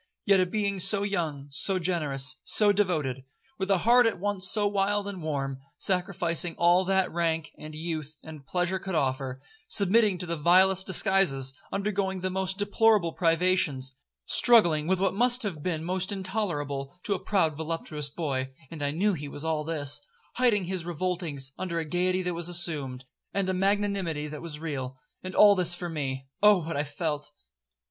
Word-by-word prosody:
Yet 200 -2 +4
a 185 - +2
being 200 0 -2
so 195 +2 +2
young, 165 -9 -3
so 190 +7 +1
generous, 155 -7 0
so 210 -1 +5
devoted, 155 -10 -1 0.4
with 190 0 -3
a 195 - +4
heart 240 +5 +4
at 225 - -2
once 195 -1 +3
so 210 +1 +4
wild 205 0 0
and 200 -3 -6
warm, 135 -4 -3 0.2
sacrificing 175 -2 +1
all 175 +2 +4
that 190 0 +1
rank, 165 -2 -1
and 155 0 -9
youth, 155 -2 -5
and 155 -3 -10
pleasure 180 +5 -1
could 190 -2 -5
offer,—submitting 175 - 0
to 180 - -2
the 170 -1 -3
vilest 185 +4 +4
disguises, 175 -9 +3 0.2
undergoing 195 -2 -2
the 185 0 -2
most 190 0 -2
deplorable 205 -3 +2
privations, 165 -6 +1 0.3
struggling 170 -11 +4
with 190 0 +1
what 195 - +1
must 245 +4 +2
have 180 -8 -4
been 160 -1 -2
most 185 +3 -2
intolerable 175 -8 -3
to 205 - -1
a 190 - -3
proud 170 -7 0
voluptuous 155 -2 -4
boy, 135 -4 -3 0.2
(and 160 -3 -8
I 145 - 0
knew 195 +8 +1
he 150 -4 -6
was 145 +2 -7
all 160 -1 -1
this), 150 -3 +1 0.3
hiding 235 -6 +2
his 185 -1 -3
revoltings 170 -5 -3
under 175 -3 -3
a 165 - -2
gaiety 180 +3 0
that 180 0 -2
was 170 0 -2
assumed, 145 -7 -2 0.3
and 200 -1 0
a - - 0
magnanimity 195 -5 -1
that 150 -1 -8
was 155 -3 -7
real—and 150 +4 -7
all 205 -1 +7
this 180 -3 +3
for 175 0 -5
me!—Oh 150 +6 +1
what 165 - -4
I 145 +1 -1
felt! 150 0 -4
175 Hz, 170 wpm, -27 LUFS, 150-195 Hz, 0.4 s, all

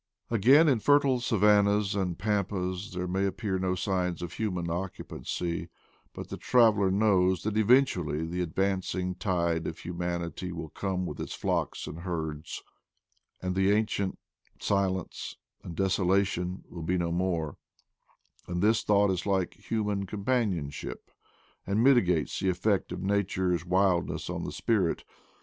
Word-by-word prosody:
Again, 130 +9 +6
in 130 -6 +3
fertile 140 0 +4
savannahs 105 -3 +3
and 95 -4 -1
pampas 95 0 -1
there 90 0 -3
may 95 +2 0
appear 95 -1 -2
no 95 0 0
signs 90 -3 -1
of 85 - -6
human 90 -6 -2
occupancy, 85 -1 -4 0.4
but - - -8
the - - -5
traveler 110 -6 +4
knows 95 -2 +3
that 105 0 -2
eventually 100 - +3
the 90 +2 -3
advancing 95 +1 -1
tide 85 -3 0
of 80 - -5
humanity 85 0 -4
will 80 -2 -6
come 95 +2 -2
with - - -6
its - - -4
flocks - - -1
and 80 - -7
herds, 80 -3 -4 0.8
and 90 0 -1
the 95 +1 +2
ancient 105 -2 +1 0.4
silence 95 -2 -1 0.2
and 85 - -8
desolation 95 -1 +1
will 85 - -8
be 90 +3 0
no 85 -1 -1
more; 85 -4 -1 0.9
and 90 +1 -2
this 110 +1 +4
thought 100 -1 +3
is 90 +1 -2
like 95 -3 +1 0.2
human 105 -3 -1
companionship, 100 - -2 0.6
and 100 +4 +2
miti 130 -2 +7
gates 90 -5 0
the 95 - +1
effect 95 +2 0
of 90 - -5
nature's 95 -3 0
wildness 90 -1 +1
on - - -4
the - - -4
spirit. 100 -8 0
95 Hz, 140 wpm, -29 LUFS, 90-105 Hz, 0.9 s, miti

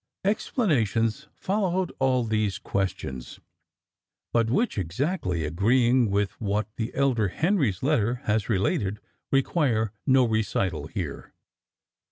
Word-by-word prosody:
Explanations 140 - +1
followed 190 -2 0
all 130 -2 +2
these 110 -3 0
questions; 65 -10 -4 0.9
but 115 -1 +2
which, 210 - +1
exactly 90 - -1
agreeing 120 +8 +3
with 100 0 +1
what 105 0 0
the 115 +1 -2
elder 130 -6 +2
Henry's 140 - 0
letter 125 -5 +2
has 110 +1 0
related, 100 0 0 0.3
require 135 - +1 0.2
no 130 -1 +5
recital 95 -8 -1
here. 80 -5 -6
115 Hz, 105 wpm, -26 LUFS, 100-135 Hz, 0.9 s, no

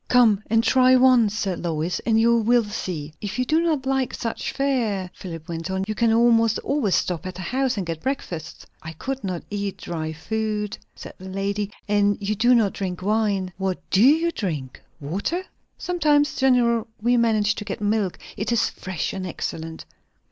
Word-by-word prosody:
"Come 230 -5 +5
and 225 +1 +3
try 255 +1 +5
once," 250 -5 +5
said 195 -5 -2
Lois, 165 +1 -1
"and 225 -1 +4
you 235 +1 +4
will 235 +1 +3
see." 180 -8 -5
"If 205 +2 -4
you 255 - +1
do 315 +5 +2
not 310 -6 0
like 265 -2 0
such 230 -1 -3
fare," 225 -10 -1
Philip 165 -4 -8
went 165 +1 -5
on, 190 0 -1
"you 215 - -1
can 230 +1 +2
almost 230 -1 +4
always 275 -10 +1
stop 180 0 -1
at 185 -1 -7
a 185 - -5
house 255 +5 0
and 195 - -2
get 165 -1 -4
breakfast." 175 - -4 0.2
"I 160 0 -7
could 265 - -5
not 185 -3 -3
eat 200 -1 -3
dry 160 -2 -4
food," 210 +5 -3 0.2
said - - -10
the 190 +1 -9
lady; 200 +1 -2 0.2
"and 205 -1 +2
you 205 +1 -1
do 240 +4 +4
not 215 -4 +2
drink 185 -2 -4
wine. 200 -3 0
What 190 -1 -1
do 195 - +4
you 320 +7 +5
drink? 150 - -4 0.2
Water?" 200 - -2 0.3
"Sometimes. 300 -4 +2
Generally 240 -4 +3
we 240 +3 +2
manage 220 -3 +3
to - - -6
get 205 - -5
milk. 205 -3 0 0.2
It 210 +3 -2
is 235 - +2
fresh 185 -3 -4
and 190 -1 -4
excellent." 160 -1 -5
210 Hz, 185 wpm, -23 LUFS, 185-240 Hz, 0.3 s, Come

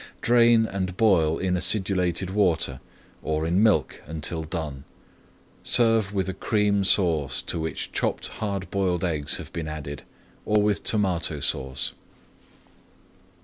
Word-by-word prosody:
Drain 115 -1 +5
and 95 -3 -4
boil 85 -8 +3
in 95 -1 -1
acidulated 90 -1 0
water 85 -10 +1 0.4
or 80 0 -2
in 90 +4 +2
milk 110 -2 +2
until 80 +1 -4
done. 75 -4 -5 0.8
Serve 115 -4 +3
with 95 -2 -1
a 95 - -3
Cream 105 0 +1
Sauce 80 -9 +2
to - - -3
which 80 0 -4
chopped - - -1
hard 100 -3 -3
boiled 95 -3 0
eggs 75 -5 +1
have - - -10
been 80 -2 -4
added, 75 -3 -6 0.4
or 105 0 +2
with 105 -1 +1
Tomato 90 -7 0
Sauce. 65 -1 -1
90 Hz, 130 wpm, -25 LUFS, 80-100 Hz, 0.8 s, Drain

